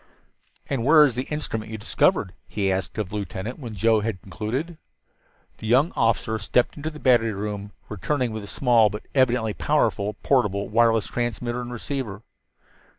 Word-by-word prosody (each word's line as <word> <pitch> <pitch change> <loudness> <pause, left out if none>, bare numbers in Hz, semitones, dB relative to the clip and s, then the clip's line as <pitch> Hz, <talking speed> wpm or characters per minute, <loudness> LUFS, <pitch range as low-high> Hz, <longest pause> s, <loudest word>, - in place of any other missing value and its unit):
"And 135 -5 -1
where 150 +3 +7
is 135 - 0
the 125 +3 -3
instrument 115 -8 -3
that - - -8
you - - -3
discovered?" 100 -3 +1
he 100 -2 -1
asked 95 -2 -3
of 105 -4 -2
the 105 - -6
lieutenant 105 +4 -5
when 120 -6 -7
Joe 110 +3 +3
had 105 -3 -3
concluded. 130 - -4 0.8
The 110 - -6
young 135 +9 +4
officer 110 -1 +1
stepped 120 +3 +1
into 155 +1 -4
the 155 -1 -11
battery 120 -5 +3
room, 100 0 -5 0.2
returning 125 +5 -1
with 110 -1 -5
a - - -8
small, 115 -2 +3
but 105 +1 -7
evidently 125 -5 +2
powerful, 100 +1 0
portable 105 -7 +1
wireless 115 0 +3
transmitter 120 0 -2
and 120 0 -6
receiver. 120 -4 -5
115 Hz, 170 wpm, -24 LUFS, 105-125 Hz, 0.8 s, where